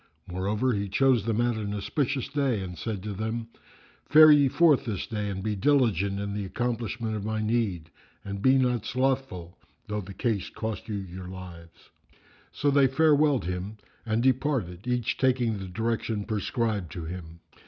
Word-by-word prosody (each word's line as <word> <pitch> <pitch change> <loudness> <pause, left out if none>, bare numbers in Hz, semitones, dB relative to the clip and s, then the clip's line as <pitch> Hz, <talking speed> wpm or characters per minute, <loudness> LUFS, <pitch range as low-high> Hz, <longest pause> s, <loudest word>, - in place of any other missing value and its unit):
Moreover, 105 +8 -1
he 100 -1 -2
chose 125 0 +3
them 115 -1 0
out 120 -1 +1
an 105 -1 -3
auspicious 135 +6 -1
day 135 -6 0
and 90 -1 -6
said 100 +1 -4
to 105 -1 -4
them, 110 +3 -4 0.6
"Fare 155 0 +9
ye 145 -2 +6
forth 150 0 +4
this 105 -6 -3
day 105 -2 -3
and 95 -1 -4
be 105 -1 -1
diligent 100 - +2
in 100 0 -3
the 105 0 -3
accomplishment 115 +1 -3
of 105 - -4
my 110 +1 -2
need 105 -7 -1 0.3
and 100 0 -5
be 130 +4 +5
not 125 -4 +1
slothful, 130 -9 -2 0.3
though 105 -1 -3
the 95 0 -10
case 110 -3 -1
cost 110 -1 -5
you 105 - -2
your 95 -2 -6
lives." 85 -3 -11 0.6
So 145 - +1
they 140 -1 +5
farewelled 145 -1 +3
him 90 +4 -4 0.3
and 110 +1 0
departed, 125 - 0
each 125 -2 -1
taking 125 -5 +1
the 95 - -6
direction 110 +1 -2
prescribed 110 -3 -2
to 85 -4 -6
him. 85 -1 -8
110 Hz, 170 wpm, -27 LUFS, 95-125 Hz, 0.6 s, Fare